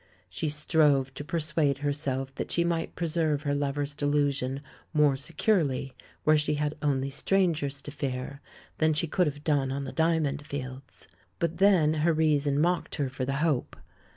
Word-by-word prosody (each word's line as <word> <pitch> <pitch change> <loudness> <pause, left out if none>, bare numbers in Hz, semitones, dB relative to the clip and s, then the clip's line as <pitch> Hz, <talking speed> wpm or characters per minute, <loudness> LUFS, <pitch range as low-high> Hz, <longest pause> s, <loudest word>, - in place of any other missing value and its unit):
She 150 - -2
strove 150 -3 +2
to 145 - -6
persuade 150 -3 0
herself 135 -2 -2
that - - -5
she 170 - +2
might 170 -1 -1
preserve 160 -3 0
her 145 -2 0
lover's 145 0 -1
delusion 145 -2 0 0.3
more 150 -2 +4
securely 140 - 0 0.3
where 155 0 +5
she 150 0 0
had 150 0 -1
only 140 -2 0
strangers 150 -3 +1
to 145 - -7
fear 140 -1 -4 0.4
than 155 -1 +3
she 160 - +1
could 175 +2 +1
have 145 0 -5
done 140 -4 +1
on 140 +1 -3
the 135 - -5
Diamond 160 -3 +1
Fields. 130 -2 -8 0.3
But 170 -1 -1
then 185 -6 +5
her 165 +1 +3
reason 150 -2 +2
mocked 175 +2 +1
her 140 -4 -1
for 130 0 -4
the 135 - -2
hope. 145 -7 0
145 Hz, 165 wpm, -28 LUFS, 140-160 Hz, 0.4 s, where